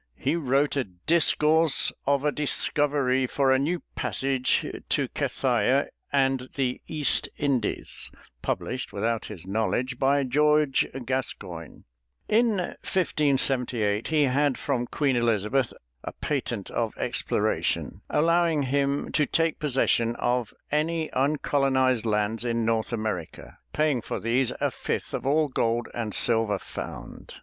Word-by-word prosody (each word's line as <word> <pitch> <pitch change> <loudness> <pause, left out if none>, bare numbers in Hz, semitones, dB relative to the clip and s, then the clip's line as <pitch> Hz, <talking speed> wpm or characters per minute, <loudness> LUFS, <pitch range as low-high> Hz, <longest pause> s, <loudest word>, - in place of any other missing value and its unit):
He 140 +5 0
wrote 140 -2 +1
a 140 - +1
"Discourse 155 - +3
of 140 0 +2
a 150 - +3
Discoverie 140 -3 +2
for 135 +1 +1
a 130 - +4
New 165 +5 -1
Passage 135 -1 0 0.2
to - - +1
Cathaia 130 +1 +1 0.2
and 135 -2 +1
the 130 -3 -1
East 150 -3 0
Indies" 130 - -2 0.3
published 130 +1 -3
without 115 +2 -1
his 95 -5 -8
knowledge 110 +5 -1
by 140 +1 +3
George 150 +1 +3 0.2
Gascoigne. 95 - -5 0.4
In 225 -1 +3
1578 135 - 0
he 155 -2 +2
had 140 +1 +2
from 125 -4 -2
Queen 140 -1 0
Elizabeth 120 +2 +1 0.3
a - - -6
patent - - -3
of - - -2
exploration, - - -1
allowing 165 -1 +2
him 140 +1 0
to 150 -2 +2
take 165 -1 0
possession 125 -5 +1
of 120 -2 -1 0.2
any 160 +2 0
uncolonized 130 -3 +1
lands 105 +1 0
in 115 -1 0
North 115 0 0
America, 110 -8 -5
paying 150 -5 +1
for - - -4
these 120 +2 +1
a - - 0
fifth - - -4
of - - -3
all 150 +2 +3
gold 120 -3 -1
and 110 -3 -3
silver 110 -3 +3
found. - - -8
135 Hz, 125 wpm, -26 LUFS, 115-145 Hz, 0.4 s, a